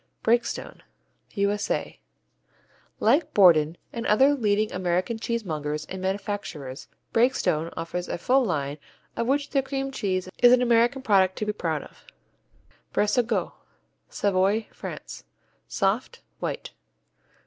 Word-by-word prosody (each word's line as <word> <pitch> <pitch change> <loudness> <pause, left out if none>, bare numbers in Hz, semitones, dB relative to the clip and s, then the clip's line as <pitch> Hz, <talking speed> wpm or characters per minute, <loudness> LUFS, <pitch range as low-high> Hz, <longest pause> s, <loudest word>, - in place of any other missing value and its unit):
Breakstone 235 +1 0 0.5
U.S.A. 205 0 -1 1.0
Like 305 +4 +2
Borden 165 -4 +5 0.2
and 230 -1 -3
other 265 +7 +5
leading 215 -5 +1
American 185 +5 -1
cheesemongers 155 -11 -3
and 190 0 -6
manufacturers, 190 -8 -4 0.3
Breakstone 225 -9 +2
offer 165 +2 -4
a 175 - -4
full 260 +9 +3
line, 145 - -2 0.4
of 230 - -1
which 280 +2 0
their 275 - +3
cream 270 0 -3
cheese 190 -8 -2
is 245 0 +7
an 250 - +5
American 240 +3 +3
product 190 -5 +3
to 215 - -3
be 210 - -1
proud 160 -7 -2
of. - - -17 0.9
Brésegaut 220 +3 +1 0.6
Savoy, 200 +2 +1
France - - -8 0.4
Soft, 225 - -1 0.2
white. - - -4
205 Hz, 115 wpm, -26 LUFS, 180-240 Hz, 1.0 s, is